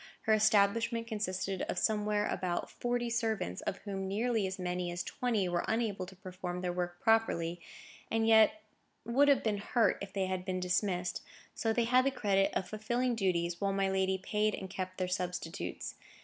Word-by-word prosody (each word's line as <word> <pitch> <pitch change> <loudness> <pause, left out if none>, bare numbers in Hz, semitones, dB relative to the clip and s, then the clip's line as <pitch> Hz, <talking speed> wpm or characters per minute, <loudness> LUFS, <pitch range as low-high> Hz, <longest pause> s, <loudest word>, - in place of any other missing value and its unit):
Her 220 - +2
establishment 220 +2 +3
consisted 195 -4 -2
of - - -2
somewhere 210 +1 +1
about 175 -3 -2
forty 240 0 -1
servants, 225 - -1
of 195 - -3
whom 195 -2 -3
nearly 220 +1 0
as 190 - -5
many 180 -1 -2
as 175 0 -3
twenty 225 -7 0
were 175 -1 0
unable 210 -5 -1
to 190 - -12
perform 180 -1 -6
their 180 -1 -1
work 175 0 -3
properly, 175 -7 +2 0.5
and 225 0 +1
yet 225 +8 +5 0.4
would 270 +5 +4
have 280 -1 +4
been 210 -2 0
hurt 220 +1 +2
if 200 -1 -6
they 195 -1 0
had 185 -1 -2
been 185 -1 -2
dismissed; 180 0 0 0.3
so 225 - 0
they 235 +1 +2
had 250 +2 +4
the 275 - +3
credit 200 -7 +2
of 185 - -1
fulfilling 240 +5 -1
duties, 175 -5 0
while 195 -1 +1
my 195 0 +1
lady 190 0 +1
paid 210 +3 0
and 190 - -7
kept 185 0 -4
their 185 - -1
substitutes. 180 -1 -3
195 Hz, 180 wpm, -32 LUFS, 185-225 Hz, 0.5 s, yet